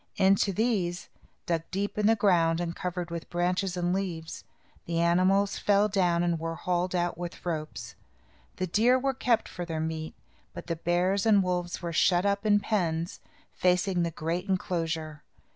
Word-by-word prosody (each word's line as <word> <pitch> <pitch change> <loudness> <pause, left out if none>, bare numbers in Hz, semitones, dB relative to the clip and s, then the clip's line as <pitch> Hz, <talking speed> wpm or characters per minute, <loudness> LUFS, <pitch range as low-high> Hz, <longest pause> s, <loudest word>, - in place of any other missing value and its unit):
Into 195 +1 +3
these, 190 -4 -1 0.4
dug 165 -2 0
deep 200 +2 -2
in 210 0 +2
the 225 - +5
ground 170 -6 +3
and 170 -1 -3
covered 180 -1 -4
with 170 -1 -6
branches 180 +1 -1
and 175 0 0
leaves, 175 -4 -4 0.4
the 165 0 -1
animals 185 +4 +2
fell 205 0 +3
down 180 -4 +1
and 170 -1 0
were 165 0 -3
hauled 180 +1 -1
out 175 -1 -1
with 175 0 -7
ropes. 155 -3 -4 0.6
The 185 - -2
deer 225 +8 +3
were 270 +1 0
kept 240 -3 +1
for 180 - -6
their 165 -2 -4
meat, 160 0 -4 0.4
but - - -7
the 170 - -2
bears 180 +5 +1
and 205 -3 +5
wolves 180 -1 -2
were 170 -1 -3
shut 175 +3 +3
up, 200 +1 0
in 205 -1 +5
pens, 170 -5 -1 0.3
facing 180 0 +1
the 170 - 0
great 170 +4 -3
enclosure. 165 -5 -2
180 Hz, 170 wpm, -28 LUFS, 170-195 Hz, 0.6 s, the